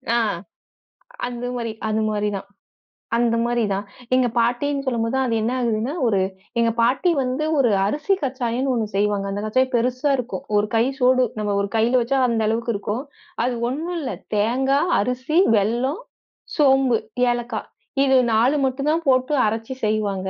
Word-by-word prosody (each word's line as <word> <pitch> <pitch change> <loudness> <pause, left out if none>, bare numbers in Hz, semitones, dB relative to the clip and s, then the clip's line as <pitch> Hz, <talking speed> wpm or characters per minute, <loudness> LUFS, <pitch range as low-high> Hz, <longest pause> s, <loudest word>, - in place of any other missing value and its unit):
ஆ - - +4 1.1
அந்த 245 0 -5
மாரி, 230 -2 -3 0.2
அது 215 0 0
மாரிதான். 205 -2 -2 0.7
அந்த 235 -1 +2
மாரிதான். 210 -4 0 0.3
எங்க 255 -1 +3
பாட்டின்னு 275 +4 +1
சொல்லும்போது 230 -1 -1
தான், 265 - +1
அது 230 - -1
என்ன 230 +3 0
ஆகுதுன்னா 235 +3 -1
ஒரு 200 -4 +2 0.4
எங்க 230 0 +3
பாட்டி 255 +9 +2
வந்து 260 +4 -1
ஒரு 240 -5 +4
அரிசி 300 - 0
கச்சாயன்னு 260 -1 -1
ஒண்ணு 225 -3 0
செய்வாங்க. 205 0 +1
அந்தக் 205 +2 -3
கச்சாயம் 255 +4 +1
பெருசா 255 +4 +1
இருக்கும். 255 +2 -5
ஒரு 205 +1 +2
கை 225 - +4 0.2
சோடு, 255 0 +4 0.2
நம்ம 205 -1 -1
ஒரு 200 - -1
கையில 235 +3 +3
வச்சா 265 +3 0
அந்த 230 -2 0
அளவுக்கு 230 +1 0
இருக்கும். 210 +5 -3 0.4
அது 250 - 0 0.2
ஒண்ணும் 330 +7 -3
இல்ல. 265 -4 -3 0.2
தேங்கா, 265 +6 +2 0.2
அரிசி, 255 - 0 0.2
வெல்லம், 240 - 0 0.6
சோம்பு, 270 -4 +4 0.3
ஏலக்காய் 240 -2 -4 0.4
இது 265 -1 +3 0.2
4 245 +7 +3
மட்டும் 270 +2 -2
தான் 330 +1 0
போட்டு 255 +3 +3
அரைச்சு 225 +4 -2
செய்வாங்க. 200 -3 -1
240 Hz, 155 wpm, -22 LUFS, 220-265 Hz, 1.1 s, ஆ